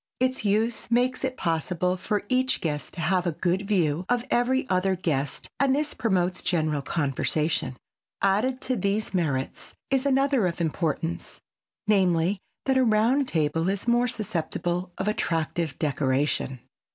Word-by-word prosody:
Its 255 -1 +1
use 220 +4 0
makes 250 +2 +1
it 260 -1 -2
possible 175 +2 0
for 205 +3 -2
each 255 +2 +2
guest 150 -3 -3
to - - -7
have 180 +2 +1
a - - +2
good 185 +5 -1
view 175 -5 +1
of 245 0 +1
every 255 +2 +2
other 190 -2 +1
guest 145 -6 -2
and 275 -1 +3
this 300 +1 -1
promotes 185 -5 0
general 155 -4 0
conversation. 145 -2 -1 0.4
Added 220 +7 +1
to 255 - 0
these 200 +2 0
merits 145 -8 -2 0.2
is 270 +1 +2
another 270 -5 +3
of 170 - -4
importance, 165 +1 -2 0.5
namely, 190 -2 +2 0.3
that 265 -1 +3
a - - +4
round 235 +5 +3
table 165 0 0
is 200 +3 -2
more 240 +1 +3
susceptible 180 -3 -2
of 190 - -2
attractive 165 -6 -1
decoration. 135 -3 0
185 Hz, 145 wpm, -26 LUFS, 165-240 Hz, 0.5 s, a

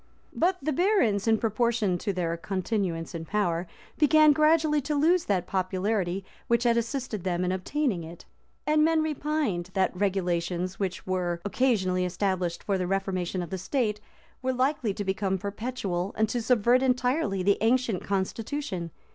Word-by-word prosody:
But 360 +2 +1
the 305 +2 0
barons, 260 - +2
in 220 0 +4
proportion 220 -4 0
to 205 - -1
their 170 -3 -1
continuance 185 -2 -2
in 165 -1 -5
power, 175 -2 -1 0.3
began 310 0 +6
gradually 305 0 +3
to 295 +2 -2
lose 330 +5 +3
that 185 -3 0
popularity 190 0 -1 0.2
which 235 0 +2
had 235 -1 +3
assisted 235 -4 -2
them 180 -1 0
in 180 - 0
obtaining 190 - -1
it; 165 +1 -11 0.4
and 305 0 +3
men 320 0 +3
repined, 295 - -1
that 190 -1 +1
regulations, 180 -2 -1
which 190 -2 -3
were 180 -2 -1
occasionally 200 -6 +1
established 180 -1 -1
for 195 -2 0
the 180 - -1
reformation 185 -2 -1
of 170 - -9
the 190 - -3
state, 210 0 -1 0.4
were 260 0 0
likely 255 -3 0
to 205 - -4
become 190 0 0
perpetual, 200 -2 -3
and 220 0 +3
to 240 +1 -1
subvert 240 +1 +3
entirely 250 - +1
the 200 +1 +3
ancient 230 -3 +1
constitution. 200 -1 -3
205 Hz, 155 wpm, -27 LUFS, 185-255 Hz, 0.4 s, began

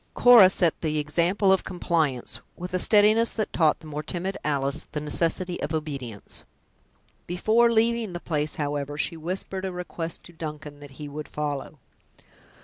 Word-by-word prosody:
Cora 235 -6 +8
set 175 -3 +1
the 155 -2 -1
example 175 +6 +2
of 190 - +1
compliance, 160 -8 -1 0.2
with 180 +1 -7
a 185 - +1
steadiness 215 +4 +5
that 215 - -3
taught 160 -3 +2
the - - -14
more 150 -1 -5
timid 180 +5 -4
Alice 140 -1 -1
the 150 - -1
necessity 170 +4 -1
of 150 +2 -2
obedience. 135 -9 -5 0.8
Before 220 +7 +3
leaving 230 -3 +1
the 175 - -4
place, 150 -3 -1
however, 145 -1 -3
she 160 - -1
whispered 185 +3 -5
a 190 - -2
request 175 -2 -6
to 175 - -14
Duncan, 150 -2 -7
that 145 -1 -11
he 150 - -7
would 150 +1 -7
follow. 150 0 -4
165 Hz, 160 wpm, -25 LUFS, 150-185 Hz, 0.8 s, Cora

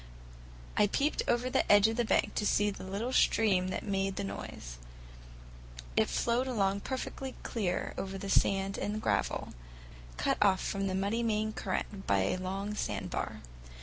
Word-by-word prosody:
I 210 - +5
peeped 280 +8 +1
over 240 +1 +2
the 255 - +2
edge 205 +1 +7
of 225 - -1
the 240 - +2
bank 220 - +2
to - - -1
see 205 0 +3
the - - -9
little 200 +7 -3
stream 195 -8 +3
that 185 - -3
made 195 -1 0
the - - -2
noise; - - -7 1.2
it - - +3
flowed 240 +2 +1
along 200 -5 +1
perfectly 260 +2 -5
clear 190 -6 -2
over 195 0 -4
the 195 - -6
sand 195 0 +2
and 210 +1 -2
gravel, - - 0 0.7
cut - - +1
off 195 -3 +5
from 195 0 -2
the 190 - -1
muddy 200 +5 0
main 215 -1 0
current 195 -2 -3
by 100 -1 +3
a 95 - 0
long 195 +3 -3
sandbar. 210 - -3
200 Hz, 165 wpm, -31 LUFS, 195-225 Hz, 1.2 s, edge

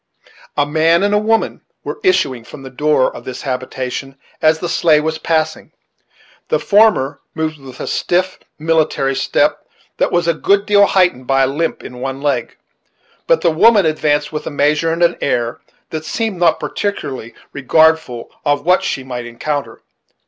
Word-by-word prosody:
A 145 - +3
man 165 +4 +2
and 205 0 +1
a 205 - +4
woman 225 +1 0 0.2
were - - -5
issuing 135 - +1
from 135 +4 -12
the 135 - -9
door 150 0 +1
of - - -9
this 130 - -7
habitation 130 +1 -4 0.2
as 155 0 +4
the 175 - -4
sleigh 165 -2 +3
was 160 +1 -2
passing, 160 -1 -1 0.7
The - - +1
former 205 -10 +3 0.2
moved 155 -1 -3
with 130 -2 -12
a - - -4
stiff, 185 +1 -1 0.2
military 155 -4 +1
step, - - +1 0.4
that - - +1
was 175 -1 +1
a 170 - +3
good 200 +5 +1
deal 205 -1 +5
heightened 180 -10 +1
by 135 0 +3
a - - +3
limp 155 +5 -2
in 125 - -9
one 135 +1 -4
leg; 145 0 -2 0.7
but - - +3
the - - +3
woman 205 +4 +5
advanced 150 -1 0
with 150 - -4
a - - -1
measure 150 +2 +1
and 165 +1 0
an 170 - +3
air 120 -4 -1 0.3
that 155 -1 -4
seemed 195 +4 -3
not 170 -2 +3
particularly 130 - -4 0.2
regardful 155 -2 +2
of 145 -1 0
what 180 +1 +4
she 130 - -2
might 125 -2 -6
encounter. 140 +5 -4
155 Hz, 170 wpm, -17 LUFS, 135-170 Hz, 0.7 s, deal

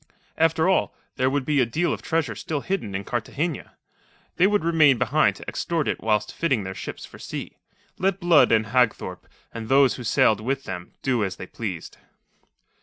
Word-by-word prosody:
After 160 +1 +2
all, 190 - +1 0.2
there 130 0 +2
would 135 -1 -1
be 150 -1 +2
a - - +3
deal 160 +9 0
of - - -6
treasure 160 -8 -1
still 145 +7 -4
hidden 155 - -3
in 95 - -3
Cartagena. 140 - -3 0.6
They 185 - +5
would 205 -2 +1
remain 155 -5 +4
behind 155 +6 +2
to - - -12
extort 165 -3 -2
it - - -2
whilst 105 -1 0
fitting 135 -11 0
their 95 0 -5
ships - - -7
for - - -14
sea. - - -7 0.4
Let 195 0 +1
Blood 175 -5 +5
and 110 -1 +3
Hagthorpe 115 -7 0 0.3
and 115 -1 -6
those 135 -1 +4
who 125 - -7
sailed 110 -1 +3
with 135 +4 -2
them 90 -5 -7
do 125 -5 +1
as 95 -2 -2
they - - -8
pleased. 95 -4 -6
135 Hz, 185 wpm, -24 LUFS, 110-160 Hz, 0.6 s, They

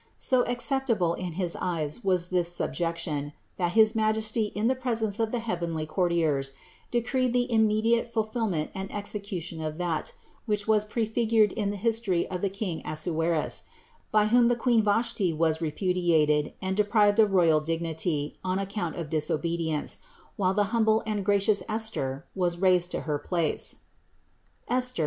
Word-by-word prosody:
So 255 -2 +3
acceptable 245 -7 0
in 180 -1 -5
his 175 0 -2
eyes 165 +2 -2
was 180 -2 +1
this 175 -2 0
subjection, 165 -4 -2 0.2
that 175 -2 0
his 220 -1 +5
Majesty 220 0 +1
in 210 +2 -1
the 260 - +3
presence 230 -5 -2
of 225 -1 0
the 245 - 0
heavenly 170 -8 -3
courtiers 155 -5 0 0.4
decreed 245 +1 0
the 245 0 +2
immediate 220 +2 +3
fulfillment 220 -7 -2
and 190 0 -5
execution 200 -5 -5
of 155 0 -4
that, 175 -3 -2 0.3
which 210 -1 -1
was 215 -1 +3
prefigured 220 -1 +2
in 205 -2 -2
the 205 - -3
history 215 -4 +1
of 180 -1 -3
the 200 - +1
king 195 -4 -4
Assuerus, 160 0 -1 0.5
by 215 -1 +4
whom 235 +2 +4
the 240 - +3
queen 235 -1 +3
Vashti 205 -4 +1
was 160 0 +1
repudiated 160 -3 +1
and 190 0 -1
deprived 210 0 +3
of 210 -3 +5
royal 165 -4 +5
dignity 160 -1 -2
on 185 0 0
account 195 -3 -3
of 170 -3 -4
disobedience, 160 0 -1 0.4
while 190 -1 +1
the 205 -1 +1
humble 220 -1 +3
and 210 -2 -2
gracious 200 +1 +3
Esther 215 -12 -1
was 175 -2 0
raised 180 -1 +3
to - - -3
her 150 -2 -2
place 170 -2 -1 0.9
(Esther? 250 -3 +1
190 Hz, 155 wpm, -27 LUFS, 165-220 Hz, 0.9 s, his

